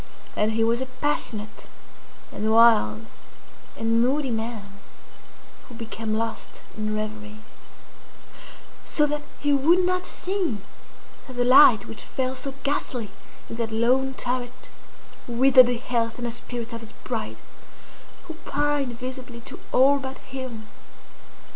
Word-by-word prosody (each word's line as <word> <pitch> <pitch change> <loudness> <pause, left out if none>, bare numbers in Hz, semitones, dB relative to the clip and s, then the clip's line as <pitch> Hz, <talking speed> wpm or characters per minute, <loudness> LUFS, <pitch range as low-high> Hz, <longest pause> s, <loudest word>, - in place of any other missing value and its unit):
And 215 +1 +1
he 225 0 +2
was 230 +2 +2
a 260 - -3
passionate, 255 -5 -3 0.6
and 215 +1 -1
wild, 220 - +5 0.7
and 225 +1 +2
moody 265 +2 +1
man, 220 -3 -5 0.9
who 245 - -11
became 225 -1 -4
lost 225 0 -4
in 215 0 -2
reveries; 215 0 -5 1.5
so 300 - +2
that 295 0 -2 0.2
he 290 0 +1
would 335 +7 +4
not 365 0 0
see 365 - -2 0.7
that 260 - -9
the 245 0 +1
light 245 -4 +7
which 225 - -9
fell 260 -1 -2
so 265 +1 -5
ghastly 250 -6 -2 0.4
in 230 - -7
that 230 -1 -2
lone 255 +4 +2
turret 250 0 -4 0.6
withered 255 +1 +6
the 245 -1 0
health 230 -2 -1
and 245 - -4
the 235 - -2
spirits 240 0 -6
of 230 - -6
his 225 - -11
bride, - - -4 0.9
who 325 - -8
pined 285 -4 -1
visibly 255 -1 -7
to - - -8
all 275 +2 +5
but 265 0 -6
him. 255 -5 -8
245 Hz, 135 wpm, -25 LUFS, 225-265 Hz, 1.5 s, light